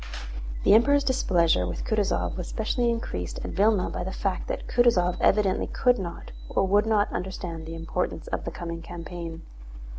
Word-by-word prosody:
The - - +6
Emperor's 280 +6 +5
displeasure 170 - +2
with 90 - -4
Kutúzov 210 -3 0
was 180 - -5
specially 235 +2 0
increased 90 - -3
at - - -4
Vílna 205 -1 +2
by - - -3
the 190 - -4
fact 195 -1 -2
that - - -4
Kutúzov 190 -8 +3
evidently 195 -2 +3
could 250 -1 +2
not 175 -3 -6 0.2
or 195 - +2
would 205 +3 +3
not 215 -2 +2
understand 175 -3 -5
the 165 - -6
importance 165 0 -3
of - - -2
the - - -3
coming 170 -1 -6
campaign. 170 -1 -7
190 Hz, 170 wpm, -26 LUFS, 170-220 Hz, 0.2 s, The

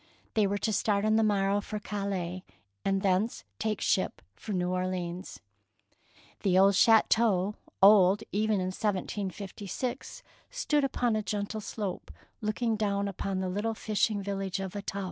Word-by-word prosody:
They 215 -2 +3
were 200 +1 -1
to 220 +1 -1
start 205 0 +1
on 215 0 +3
the 225 - +4
morrow 200 -1 +2
for 210 +1 -5
Calais, 195 -4 -3 0.4
and 195 0 0
thence 195 +4 +1 0.2
take 215 -1 -1
ship - - 0
for 215 - -8
New 180 -2 0
Orleans. 180 -1 -3 1.0
The 185 -2 +3
old 195 +1 +6
chateau 215 -2 +4 0.2
— - - -11
old 195 -1 +7
even 215 +1 +1
in 185 -2 -1
1756 200 +3 -4
— - - -32
stood 305 - 0
upon 245 -4 +1
a 215 - 0
gentle 210 +1 -3
slope 205 -3 -5 0.3
looking 220 +2 0
down 200 -1 0
upon 195 0 -3
the 185 - -1
little 205 +5 -2
fishing 210 -1 0
village 195 -1 -3
of 190 -1 -4
Staples. 200 0 -5
200 Hz, 155 wpm, -29 LUFS, 190-215 Hz, 1.0 s, old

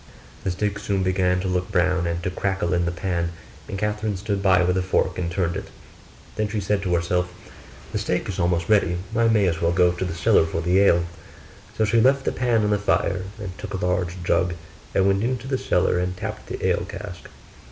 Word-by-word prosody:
The - - -1
steak 100 +2 -1
soon 100 -2 -1
began 90 0 +2
to 95 - -2
look 90 0 -1
brown, 90 -1 +2
and 85 0 -2
to 90 - -1
crackle 95 -1 -1
in 85 -1 +1
the 85 - 0
pan; 85 -1 -2 0.3
and - - -4
Catherine 105 0 -1
stood 100 0 -2
by 95 -2 +4
with 90 +1 +2
a - - +2
fork 90 0 0
and 85 -2 -1
turned 85 -1 -1
it: - - -5 0.7
then 110 0 +1
she 105 +1 -2
said 100 0 0
to 90 -3 0
herself, 90 +1 0 0.6
'The - - -1
steak - - -1
is 95 -1 -4
almost 85 -1 +1
ready, 100 -5 +3 0.2
I 115 0 +4
may 110 -3 +3
as 85 -2 0
well 85 0 +2
go 90 0 +4
to 90 +1 -4
the 85 -3 -3
cellar 80 0 +4
for 80 - -2
the 90 +3 +3
ale.' 85 -4 +4 0.7
So 110 - +3
she 115 +2 +3
left 135 +2 +3
the - - +1
pan 120 -3 +1
on 105 - +1
the 105 - +2
fire 95 -2 0
and 95 -4 -6
took 105 -1 -5
a 95 - -2
large 90 0 -1
jug 90 0 +1 0.4
and 95 - +4
went 100 0 +3
into 125 0 -1
the 130 -1 -1
cellar 90 0 +1
and 90 0 -2
tapped - - -6
the - - -4
ale - - +2
cask. 90 -1 -8
95 Hz, 225 wpm, -23 LUFS, 90-105 Hz, 0.7 s, by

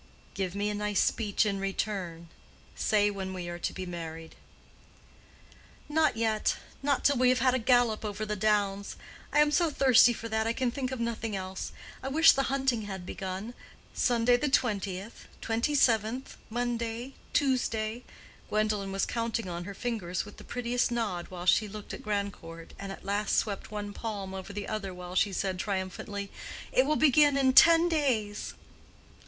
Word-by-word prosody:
"Give 190 -1 -3
me 205 +1 0
a - - -3
nice 210 -1 -1
speech 215 -2 +1
in 200 -2 -1
return. 190 -4 -3 0.5
Say 205 -1 +2
when 190 -1 -5
we 180 -1 -5
are 175 0 -6
to - - -2
be 185 - -6
married." 165 -2 -7 1.5
"Not 310 -5 +2
yet. 220 -1 +1 0.2
Not 280 -1 0
till 285 -1 +4
we 250 0 +4
have 255 - +4
had 255 -1 +3
a 260 - +1
gallop 240 -2 +3
over 210 0 -3
the 210 0 -2
downs. 200 -1 0 0.4
I - - +5
am 300 0 +4
so 335 +2 +3
thirsty 260 -4 +6
for 230 -1 -5
that, 220 0 0
I 230 - +1
can 255 0 0
think 255 0 -3
of 260 - -4
nothing 230 -2 -2
else. 190 0 -5 0.3
I - - -5
wish 320 +4 +7
the 275 - +1
hunting 265 -4 +1
had 190 -3 -6
begun. 190 +5 -5 0.4
Sunday 245 0 +3
the 295 +3 0
twentieth, 205 -4 -1
twenty 230 +6 0
seventh, 235 0 +2
Monday, 240 +1 -3 0.2
Tuesday." 240 -4 0 0.5
Gwendolen 210 -2 0
was 195 0 0
counting 230 -2 -2
on 175 0 -5
her 200 0 -7
fingers 195 -8 -3
with - - -12
the - - -11
prettiest 245 0 -1
nod 210 -7 -2
while 180 -1 -7
she 215 +3 +4
looked 210 0 -8
at - - -7
Grandcourt, 200 -5 -4
and 195 0 -5
at 195 - -10
last 205 +2 0
swept 200 -3 -1
one 205 -1 -5
palm 200 -4 -5
over 190 +1 -6
the 205 0 -5
other 195 -4 -4
while 180 0 -8
she 200 +2 +2
said 190 -1 -2
triumphantly, 200 +1 -4 0.4
"It 260 +2 +3
will 305 - +2
begin 295 -1 +5
in 265 -1 +3
ten 335 +4 +8
days!" 255 -11 -1
215 Hz, 175 wpm, -29 LUFS, 195-245 Hz, 1.5 s, ten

